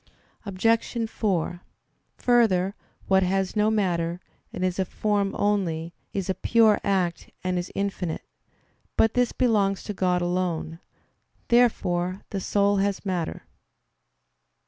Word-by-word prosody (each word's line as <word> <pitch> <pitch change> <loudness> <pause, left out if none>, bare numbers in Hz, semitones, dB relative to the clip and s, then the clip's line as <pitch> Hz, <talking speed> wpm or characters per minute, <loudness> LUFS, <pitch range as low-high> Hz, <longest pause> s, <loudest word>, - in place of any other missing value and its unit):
Obj. 225 +4 +1
4: 180 -5 -1 0.6
Further, 205 -6 +3 0.3
what 190 0 +4
has 190 +1 0
no 210 0 +3
matter, 175 -5 0 0.3
and 185 - -2
is 185 0 -2
a 190 - +2
form 205 +1 -1
only, 175 -5 0 0.2
is 195 -3 -3
a 190 - +1
pure 220 0 +4
act, 185 -4 0
and 180 -1 0
is 175 - -6
infinite. 195 -4 -2 0.7
But 225 - +4
this 245 -1 +2
belongs 205 -6 +1
to 210 - -4
God 180 -2 +1
alone. 175 -2 -2 0.7
Therefore 185 -6 +2
the 195 - -2
soul 200 +1 +2
has 200 +1 -1
matter. 180 -4 -2
195 Hz, 125 wpm, -25 LUFS, 180-210 Hz, 0.7 s, what